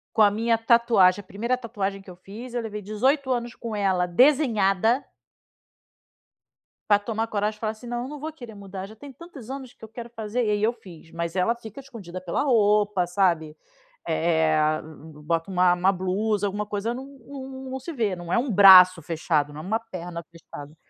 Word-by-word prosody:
Com -, -, +1 dB
a 205 Hz, -, +5 dB
minha 225 Hz, +2 st, +1 dB
tatuagem, 215 Hz, -5 st, +4 dB
a 200 Hz, -, -15 dB
primeira 235 Hz, +7 st, -2 dB
tatuagem 200 Hz, -5 st, -4 dB
que 195 Hz, -, -13 dB
eu 180 Hz, -, -12 dB
fiz, 215 Hz, +7 st, -10 dB
eu 240 Hz, -, -2 dB
levei 210 Hz, -2 st, -6 dB
18 260 Hz, +7 st, 0 dB
anos 240 Hz, -1 st, -3 dB
com 230 Hz, -2 st, -6 dB
ela 190 Hz, -3 st, +1 dB
desenhada. 230 Hz, -, +3 dB, 1.9 s
Pra 205 Hz, -, +6 dB
tomar 220 Hz, +2 st, -3 dB
coragem 210 Hz, 0 st, -1 dB
e -, -, -25 dB
falar 215 Hz, -, -1 dB
assim: 220 Hz, +3 st, -14 dB
"Não, 240 Hz, +1 st, -4 dB
não 295 Hz, +1 st, -8 dB
vou 315 Hz, +2 st, -5 dB
querer 240 Hz, -8 st, -11 dB
mudar, 195 Hz, -1 st, -8 dB
já 215 Hz, +2 st, -14 dB
tem 280 Hz, +4 st, -11 dB
tantos 270 Hz, -5 st, -12 dB
anos 265 Hz, -2 st, -7 dB
que -, -, -15 dB
eu -, -, -10 dB
quero 235 Hz, +1 st, -9 dB
fazer", 225 Hz, 0 st, -4 dB
aí 210 Hz, -3 st, 0 dB
eu 225 Hz, +2 st, +3 dB
fiz, 180 Hz, -9 st, -15 dB
mas 170 Hz, +1 st, -4 dB
ela 190 Hz, +6 st, +2 dB
fica 225 Hz, +1 st, -11 dB
escondida 210 Hz, -10 st, -9 dB
pela 180 Hz, -2 st, -2 dB
roupa, 210 Hz, -6 st, +2 dB
sabe? 170 Hz, -4 st, 0 dB, 0.5 s
Eh, 160 Hz, -2 st, +1 dB, 0.4 s
bota 165 Hz, +3 st, -1 dB
uma 180 Hz, -1 st, +3 dB
uma 185 Hz, +2 st, +2 dB
blusa, 200 Hz, +3 st, -1 dB
alguma 205 Hz, +1 st, -3 dB
coisa, 210 Hz, +2 st, -3 dB
não 260 Hz, +2 st, -7 dB
não 265 Hz, 0 st, -10 dB
não 265 Hz, 0 st, -5 dB
se 300 Hz, +6 st, -7 dB
vê, 220 Hz, -, -1 dB
não 175 Hz, 0 st, -7 dB
é -, -, +3 dB
um 250 Hz, +2 st, -1 dB
braço 185 Hz, -3 st, +8 dB
fechado, 155 Hz, -2 st, -1 dB
não 150 Hz, -, -9 dB
é -, -, -8 dB
uma 215 Hz, +4 st, 0 dB
perna 180 Hz, -6 st, -7 dB
fechada. 155 Hz, -3 st, -12 dB
210 Hz, 195 wpm, -24 LUFS, 185-240 Hz, 1.9 s, braço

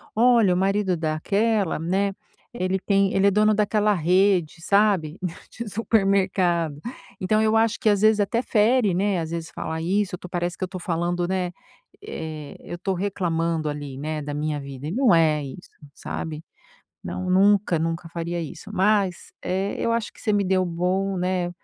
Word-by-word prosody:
"Olha, 230 Hz, -4 st, +5 dB
o -, -, 0 dB
marido 195 Hz, 0 st, +1 dB
daquela, 195 Hz, +6 st, 0 dB
né, 190 Hz, +5 st, 0 dB, 0.4 s
ele 190 Hz, -4 st, -1 dB
tem 195 Hz, 0 st, +2 dB
ele 195 Hz, +1 st, +3 dB
é -, -, +7 dB
o -, -, -1 dB
dono 215 Hz, +2 st, +4 dB
daquela 210 Hz, 0 st, +2 dB
rede, 180 Hz, -1 st, +2 dB
sabe, 195 Hz, -4 st, +2 dB, 0.3 s
de 235 Hz, 0 st, -7 dB
supermercado". 190 Hz, -7 st, +1 dB, 0.4 s
Então, 215 Hz, +4 st, +2 dB
eu 220 Hz, 0 st, +2 dB
acho 225 Hz, 0 st, +2 dB
que 220 Hz, -, +2 dB
às 205 Hz, -1 st, +3 dB
vezes 215 Hz, 0 st, +4 dB
até 205 Hz, +4 st, 0 dB
fere, 220 Hz, -2 st, +3 dB
né? 195 Hz, 0 st, +1 dB
Às 160 Hz, -, -4 dB
vezes 165 Hz, -1 st, -5 dB
falar 160 Hz, 0 st, -4 dB
isso, 185 Hz, +2 st, 0 dB
to 180 Hz, -, -10 dB
parece 175 Hz, 0 st, -2 dB
que -, -, -4 dB
eu -, -, -1 dB
tô 185 Hz, -, -6 dB
falando, 175 Hz, 0 st, -1 dB
né, 185 Hz, -1 st, -1 dB, 0.5 s
eh, 155 Hz, -, -7 dB
eu 175 Hz, -, -7 dB
tô 190 Hz, +2 st, -1 dB
reclamando 170 Hz, -4 st, -1 dB
ali, 145 Hz, -2 st, -6 dB
né, 155 Hz, +2 st, -3 dB
da 145 Hz, 0 st, -5 dB
minha 150 Hz, 0 st, -2 dB
vida, 140 Hz, 0 st, -7 dB
e -, -, -3 dB
não 235 Hz, -1 st, +3 dB
é 155 Hz, -3 st, +3 dB
isso, 140 Hz, +6 st, -9 dB, 0.2 s
sabe? 155 Hz, +1 st, -6 dB, 0.6 s
Não, 185 Hz, 0 st, -4 dB
nunca, 195 Hz, -2 st, +4 dB
nunca, 165 Hz, +1 st, -3 dB
faria 170 Hz, +1 st, -3 dB
isso, 165 Hz, +6 st, -8 dB
mas, 195 Hz, -2 st, +1 dB
eh, 190 Hz, +2 st, -1 dB
eu 230 Hz, -, 0 dB
acho 230 Hz, -2 st, -2 dB
que -, -, -16 dB
você 215 Hz, -, 0 dB
me 205 Hz, -1 st, +2 dB
deu 185 Hz, -1 st, +1 dB
bom, 185 Hz, +3 st, -1 dB
né, 180 Hz, -1 st, -1 dB
185 Hz, 180 wpm, -24 LUFS, 165-205 Hz, 0.6 s, é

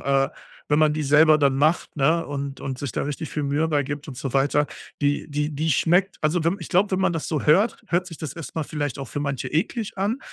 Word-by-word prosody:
äh, 135 Hz, 0 st, +2 dB, 0.4 s
wenn 150 Hz, +1 st, +3 dB
man 155 Hz, -1 st, +4 dB
die 155 Hz, 0 st, -2 dB
selber 155 Hz, +2 st, +6 dB
dann 140 Hz, -2 st, +3 dB
macht, 155 Hz, +5 st, +1 dB
ne, 160 Hz, +4 st, +2 dB
und 140 Hz, -1 st, -5 dB
und 130 Hz, -1 st, -4 dB
sich 140 Hz, -4 st, -4 dB
da -, -, -1 dB
richtig 145 Hz, +2 st, -4 dB
viel 150 Hz, -, -2 dB
Mühe 145 Hz, +3 st, +1 dB
bei 150 Hz, -2 st, +2 dB
gibt 145 Hz, +1 st, -6 dB
und 130 Hz, -, -7 dB
so 135 Hz, -3 st, -4 dB
weiter, 145 Hz, +2 st, +2 dB, 0.3 s
die 145 Hz, +1 st, 0 dB
die 150 Hz, +1 st, -1 dB
die 155 Hz, +3 st, 0 dB
schmeckt 175 Hz, +7 st, +2 dB
also, 160 Hz, +2 st, +1 dB
wenn 170 Hz, +4 st, +1 dB
ich -, -, -8 dB
glaube, 195 Hz, +2 st, +2 dB
wenn 185 Hz, -, +1 dB
man 185 Hz, -, +2 dB
das 165 Hz, -, -3 dB
so 155 Hz, -4 st, -1 dB
hört, 195 Hz, +10 st, +3 dB
hört 180 Hz, -1 st, 0 dB
sich 165 Hz, -, -10 dB
das 155 Hz, -4 st, -5 dB
erst 160 Hz, -4 st, -9 dB
mal 160 Hz, -, 0 dB
vielleicht 145 Hz, -3 st, -3 dB
auch 135 Hz, -, -5 dB
für 145 Hz, -, -4 dB
manche 135 Hz, -2 st, -2 dB
eklig 205 Hz, -, -2 dB
an, 205 Hz, +6 st, 0 dB
150 Hz, 255 wpm, -24 LUFS, 140-165 Hz, 0.4 s, selber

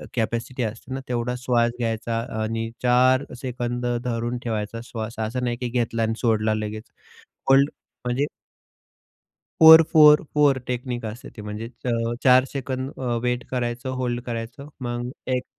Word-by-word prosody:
Capacity 120 Hz, +2 st, -2 dB
असते 115 Hz, +3 st, -5 dB
ना, 135 Hz, -, -3 dB
तेवढा 125 Hz, 0 st, -1 dB
श्वास 120 Hz, -2 st, +2 dB
घ्यायचा 115 Hz, 0 st, -1 dB, 0.2 s
आणि 115 Hz, +1 st, -2 dB
4 130 Hz, +2 st, +4 dB, 0.2 s
सेकंद 120 Hz, -1 st, -3 dB, 0.2 s
धरून 120 Hz, 0 st, -2 dB
ठेवायचा 110 Hz, -1 st, -3 dB
श्वास 115 Hz, -1 st, -6 dB
असं 115 Hz, +3 st, -2 dB
नाही 120 Hz, -1 st, -1 dB
की 125 Hz, -, -1 dB
घेतला 115 Hz, -1 st, -1 dB
आणि 110 Hz, 0 st, 0 dB
सोडला 110 Hz, -2 st, +1 dB
लगेच, 110 Hz, 0 st, -4 dB, 0.7 s
होल्ड 135 Hz, +1 st, +6 dB, 0.4 s
म्हणजे 125 Hz, +3 st, +1 dB, 1.3 s
4-4-4 150 Hz, -3 st, +7 dB
टेक्निक 125 Hz, -1 st, -3 dB
असते. 110 Hz, 0 st, -8 dB
म्हणजे 105 Hz, +2 st, -6 dB, 0.2 s
चा -, -, 0 dB, 0.3 s
4 130 Hz, 0 st, +6 dB
सेकंड 130 Hz, -1 st, -4 dB
अ, 125 Hz, -2 st, -1 dB
वेट 125 Hz, 0 st, 0 dB
करायचं, 125 Hz, 0 st, -2 dB
होल्ड 120 Hz, -1 st, -1 dB
करायचं 120 Hz, +3 st, -6 dB, 0.2 s
मग 120 Hz, 0 st, -3 dB, 0.3 s
एक 125 Hz, -, -3 dB
120 Hz, 135 wpm, -24 LUFS, 115-130 Hz, 1.3 s, 4-4-4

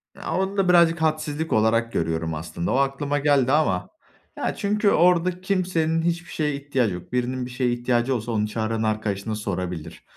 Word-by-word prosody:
Ya, -, -, -5 dB
onu 190 Hz, +1 st, -1 dB
da 190 Hz, -2 st, +2 dB
birazcık 170 Hz, -2 st, +5 dB
hadsizlik 155 Hz, 0 st, -1 dB
olarak 115 Hz, +1 st, +2 dB
görüyorum, 80 Hz, -2 st, -1 dB
aslında. 80 Hz, +2 st, -4 dB
O -, -, +1 dB
aklıma 140 Hz, +1 st, 0 dB
geldi 140 Hz, -3 st, +3 dB
ama 95 Hz, -13 st, +1 dB, 0.5 s
ya, -, -, -2 dB
çünkü 210 Hz, 0 st, +1 dB
orada 180 Hz, +1 st, +3 dB
kimsenin 175 Hz, -4 st, 0 dB
hiçbir 170 Hz, +1 st, -2 dB
şeye 150 Hz, -2 st, -1 dB
ihtiyacı 135 Hz, -7 st, -1 dB
yok. 90 Hz, 0 st, -9 dB
Birinin 125 Hz, 0 st, -1 dB
bir 125 Hz, -, -8 dB
şeye 125 Hz, 0 st, 0 dB
ihtiyacı 120 Hz, +1 st, 0 dB
olsa 120 Hz, 0 st, -3 dB
onu 105 Hz, -1 st, 0 dB
çağıran 110 Hz, +1 st, -2 dB
arkadaşına 110 Hz, -1 st, -2 dB
sorabilir. 90 Hz, -5 st, -5 dB
130 Hz, 170 wpm, -24 LUFS, 110-165 Hz, 0.5 s, birazcık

